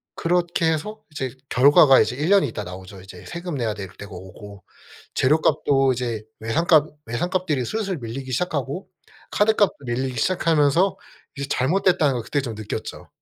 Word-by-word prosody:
그렇게 175 -1 +1
해서 210 +8 -4
이제 135 -3 -3 0.2
결과가 135 +1 +6
이제 - - +1
1 150 +4 -1
년 200 0 +5
있다가 105 -7 -4
나오죠 95 +1 -10
이제. 95 -1 -12
세금 175 -1 -5
내야 120 -5 -1
될 100 -3 -7
때가 100 - -10
오고 95 +2 -11 0.5
재료값도 140 -1 +3
이제 120 -3 -3 0.2
외상값 155 +6 +3 0.2
외상값들이 155 +2 -1
슬슬 200 - -2
밀리기 130 +2 -6
시작하고 145 +2 -2 0.4
카드값도 205 -1 +2
밀리기 125 0 -2
시작하면서 165 - +2 0.4
이제 140 0 -4
잘못됐다는 155 +1 +2
걸 120 - -2
그때 140 +5 -1
좀 120 -4 -5
느꼈죠. 105 -1 -6
140 Hz, 360 characters per minute, -23 LUFS, 115-170 Hz, 0.5 s, 결과가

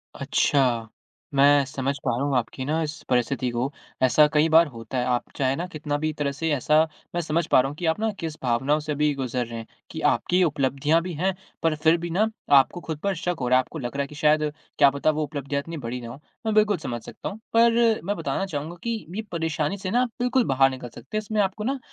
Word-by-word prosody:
अच्छा। 120 -5 +1 0.5
मैं 140 +1 +6
समझ 135 +1 -2
पा - - +1
रहा 135 - -1
हूँ 140 - 0
आपकी 125 +2 -3
ना 160 +3 0
इस 155 0 -3 0.2
परिस्थिति 125 +1 +1
को। 125 +4 -1 0.3
ऐसा 150 +4 +6
कई 150 +1 +4
बार 165 +1 +6
होता 115 0 -7
है। 125 - +1
आप 125 -1 -1
चाहे 135 -1 +1
ना 175 - -3
कितना 150 -3 -3
भी 155 +1 -1
एक 155 - -7
तरह 140 -1 0
से 160 +4 -3
ऐसा 150 +3 +3 0.3
मैं 175 - +1
समझ 160 +1 0
पा - - +5
रहा 135 - -1
हूँ 145 - -8
कि 175 - -4
आप 160 +5 +1
ना 220 0 +1
किस 160 -3 -4
भावनाओं 135 +5 +1
से 150 0 -5
अभी 150 0 +1
गुज़र 125 -2 -2
रहे 115 0 -7
हैं, 115 - -9 0.2
कि 160 - -6
आपकी 180 +1 +1
उपलब्धियाँ 145 +1 +1
भी 180 0 -5
हैं 185 +5 0 0.3
पर 165 -1 +2
फिर 160 +2 +3
भी 170 0 -5
ना 205 +6 +2 0.3
आपको 140 +6 +4
खुद 160 - -3
पर 200 -2 0
शक 175 +2 -2
हो 125 - -1
रहा 130 +1 +5
है। - - +5
आपको 155 - -9
लग 120 0 -5
रहा 140 - 0
है 140 - -2
कि 150 - -12
शायद 150 +1 +3 0.3
क्या 140 - +7
पता 140 +3 +1
वो 155 0 -1
उपलब्धियाँ 140 -1 -3
इतनी 165 +2 -7
बड़ी 125 -1 -5
ना 115 - -7
हो। 130 - -9 0.3
मैं 220 - +1
बिल्कुल 210 -3 +4
समझ 120 -6 -5
सकता - - -6
हूँ। 205 +2 -9
पर 230 -1 +4
मैं 205 +4 -1
बताना 195 - -2
चाहूँगा 155 -1 -5
कि 230 -2 -3
ये 220 - -1
परेशानी 160 +2 -1
से 185 -1 -4
ना 245 +3 +3
बिल्कुल 250 +1 +2
बाहर 135 0 +4
निकल 130 -2 -7
सकते 135 - -7
हैं। - - 0
इसमें 215 0 0
आपको 195 +2 -1
ना 270 +4 -1
150 Hz, 250 wpm, -25 LUFS, 135-175 Hz, 0.5 s, क्या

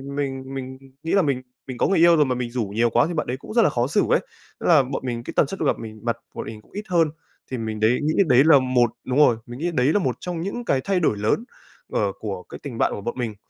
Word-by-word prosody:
mình 135 -2 -3
mình 130 -1 -6 0.3
nghĩ 165 - -2
là 200 - +5
mình 140 -6 0 0.3
mình 130 -2 -6
có - - +2
người 195 - +2
yêu 170 0 +7
rồi 150 -2 +4
mà 130 -1 -1
mình 120 -1 -3
rủ 120 -1 -1
nhiều 120 +1 +3
quá 120 +5 +3
thì 175 - -4
bạn 155 - -2
đấy 125 - -2
cũng 145 - -10
rất 235 - +5
là 220 - +4
khó 120 0 0
xử 205 +8 +2
ấy, - - +4 0.4
ơ, - - -4
là 155 -5 +6
bọn 130 +1 -4
mình 120 -2 -3
cái - - -7
tần - - +4
suất 195 - -6
gặp 150 - +1
mình 110 -1 -8
mặt 115 0 -1 0.2
bọn - - -5
mình 110 -1 -8
cũng - - -27
ít 205 - -5
hơn. 165 -3 +3 0.4
Thì 130 - -2
mình 110 -2 -4
đấy 110 +3 +3
nghĩ 155 +1 +1
đấy 130 -1 +6
là 160 -3 +7
một 125 -2 +2
đúng 130 - -2
rồi, 145 -6 +5
mình 120 +1 -9
nghĩ 175 +3 -1
đấy 135 0 +2
là - - +3
một 130 - -1
trong 175 -2 -4
những 200 +7 -4
cái 135 - +1
thay 195 -2 +1
đổi 150 -11 +1
lớn 105 - 0 0.5
ở 100 -2 +1
của 95 -4 -5
cái - - -10
tình 135 -6 -6
bạn - - +2
của - - -5
bọn 120 - -4
mình. 115 -4 -3
130 Hz, 300 wpm, -23 LUFS, 120-160 Hz, 0.5 s, yêu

